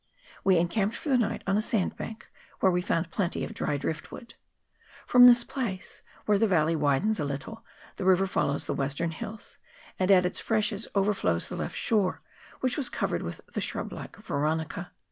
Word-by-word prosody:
We 190 -2 +4
encamped 195 +6 +1
for 305 - -5
the 260 - +4
night 225 -1 -1
on 195 +1 +2
a - - +2
sandbank, 220 0 -2 0.3
where 190 - +4
we 180 0 +1
found 165 -1 -1
plenty 185 -5 -1
of - - -5
dry 145 - -1
drift 155 +2 -4
wood. 235 -2 -10 0.7
From 250 0 +8
this 240 -1 +7
place, 225 -10 -5 0.2
where 205 -1 +3
the 225 - +4
valley 165 -4 +2
widens 155 +8 +1
a - - 0
little, 145 +11 -5 0.3
the - - -3
river 190 0 +5
follows 145 -6 -1
the - - -2
western 140 +4 -1
hills, 215 +5 -8 0.4
and 185 0 +1
at 185 -2 +6
its 180 - 0
freshes 215 -1 0
overflows 195 - +1
the - - -5
left - - -4
shore, 185 -7 0 0.4
which 255 -1 0
was 280 -4 0
covered - - -1
with - - -6
the - - -1
shrublike - - -4
veronica. 160 0 -2
190 Hz, 185 wpm, -28 LUFS, 160-220 Hz, 0.7 s, From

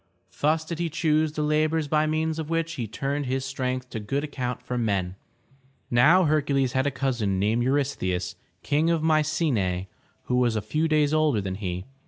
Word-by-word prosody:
Thus 155 +2 +2
did 170 0 -5
he 170 -1 0
choose 155 -1 +1
the 150 - -2
labors 155 +1 +1
by 155 +1 +2
means 160 +1 -1
of 155 -1 -4
which 165 0 -1
he 120 -8 -4
turned 140 +5 -3
his 130 +1 -1
strength 130 -1 -3
to 110 - -4
good 135 +7 -2
account 125 -4 -4
for 125 0 -4
men. 100 -6 -1 0.8
Now 165 +10 +6
Hercules 145 -4 +1
had 130 +1 +1
a - - +3
cousin 125 -8 -1
named 105 +5 +1
Eu 125 +2 +1
rystheus, 95 -12 -1 0.3
Kang 150 +3 +2
of 165 -2 +1
My 155 -1 +4
ce'nae, 120 - 0 0.4
who 125 - 0
was 120 -2 +2
a 110 - 0
few 155 +9 0
days 155 -1 +2
older 155 -7 +3
than 95 -2 -3
he. 90 -2 -4
140 Hz, 195 wpm, -26 LUFS, 120-155 Hz, 0.8 s, Now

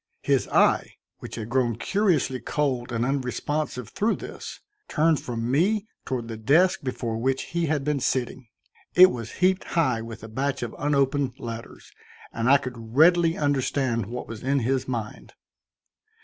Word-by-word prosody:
His - - +2
eye, - - +2 0.2
which - - -8
had 115 0 -6
grown 120 -3 +1
curiously 155 - +1
cold 130 -5 -1
and 115 0 0
unresponsive 135 -1 -2
through 220 - 0
this, - - -8 0.3
turned 155 0 +2
from 115 0 -3
me 195 +9 +2 0.2
toward 125 -3 -3
the 115 -1 -6
desk 170 - +3
before 120 -4 -3
which 135 +2 0
he 170 -1 0
had 150 -2 0
been 150 0 0
sitting. 130 -1 -2 0.5
It 185 +1 +9
was 115 -2 -6
heaped 185 +1 +2
high 130 -9 +2
with 115 -1 -9
a - - -7
batch 135 +4 -2
of 120 - -5
unopened 140 -2 +1
letters, 115 -2 -8 0.4
and 115 +2 0
I 140 - +8
could 120 -3 -8
readily 165 +2 +5
understand 130 -5 0
what 125 +2 -6
was 115 -2 -8
in 135 +1 +1
his 130 +2 0
mind. 115 -4 -5
130 Hz, 160 wpm, -25 LUFS, 120-150 Hz, 0.5 s, It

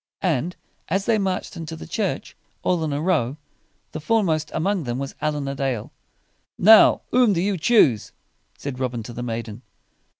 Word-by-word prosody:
And 170 0 0 0.3
as 195 +4 0
they 225 -2 +2
marched 190 -1 -2
into 165 -1 -6
the - - -9
church, - - -3 0.3
all 175 -3 +1
in 155 - -1
a 140 - -1
row, 150 -6 0 0.5
the 155 - -5
fore 220 +8 +2
most 155 -4 0
among 185 +2 0
them 120 0 -2
was 135 0 -4
Allin 150 -2 -1
a 140 - -2
Dale. 135 -5 -3 0.7
"Now 220 +3 +7
whom 245 -4 +4
do 170 - 0
you 195 +3 0
choose?" 155 - +3 0.5
said 140 -3 -6
Robin 125 -3 -2
to 120 - -9
the 120 - -6
maiden. 115 -2 -5
155 Hz, 175 wpm, -23 LUFS, 130-185 Hz, 0.7 s, Now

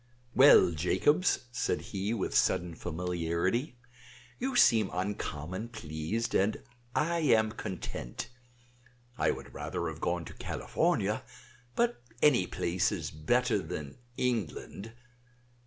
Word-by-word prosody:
"Well, 130 -9 +8
Jacobs," 95 - +2
said 125 - 0
he, 100 +2 -1
with 115 -5 -2
sudden 90 -1 +2
familiarity, 90 - -2 0.6
"you 265 +1 -2
seem 110 - +5
uncommon 95 +1 -3
pleased, 85 +2 -3
and 100 +3 +2 0.4
I 170 +2 +1
am 110 -8 +3
content. 95 - -5 0.9
I - - +3
would - - -4
rather 85 - -3
have 80 0 -8
gone 85 -1 -1
to - - -9
California; - - 0 0.5
but 235 - +1 0.2
any 125 -11 +4
place 90 +4 0
is 85 -8 -3
better 120 +9 +1
than 80 - -6 0.2
England. 110 -2 -2
100 Hz, 110 wpm, -31 LUFS, 85-120 Hz, 0.9 s, Well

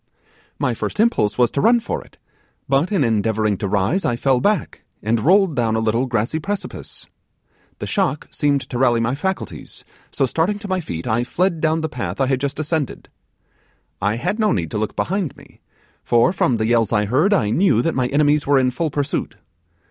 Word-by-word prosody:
'My - - 0
first - - -5
impulse 220 - +2
was 120 -2 +3
to 140 - -1
run 235 +6 +5
for 230 - -4
it; - - -23 0.5
but, 140 +7 +1
in 195 -8 +2
endeavouring 110 -2 +1
to 100 - -2
rise, 100 - +1
I 120 - +1
fell 130 0 +1
back, 210 -1 0 0.2
and 110 +2 +1
rolled 185 - +3
down 115 -3 +1
a - - +1
little 115 +4 0
grassy 120 +6 -1
precipice. 200 +5 -6 0.7
The - - -5
shock 185 -7 -1
seemed 145 -2 +1
to 120 - -2
rally 120 -3 +3
my 115 +2 0
faculties; 190 +7 -5 0.2
so, 135 - 0
starting 165 - 0
to 205 0 -8
my 185 -1 0
feet, 85 - -6
I 115 +2 +1
fled 170 +5 -1
down 160 0 +1
the 160 - -1
path 125 -3 -5
I 135 - +3
had 130 -1 0
just 140 +1 -2
ascended. 155 -2 -3 0.9
I 100 +3 +1
had 200 - -2
no 215 - +3
need 85 -5 -1
to 105 - -2
look 110 - -3
behind 190 -5 -2
me, - - -18 0.4
for, 120 +8 +3
from 130 -9 +1
the 110 - 0
yells 115 -2 +2
I 105 -2 +2
heard, 140 - +2
I 155 - +2
knew 135 - +3
that 165 - 0
my 130 -1 0
enemies 145 +2 +2
were 140 -1 +4
in 130 -1 +2
full 160 +6 -2
pursuit. 145 0 -2
135 Hz, 200 wpm, -20 LUFS, 115-165 Hz, 0.9 s, run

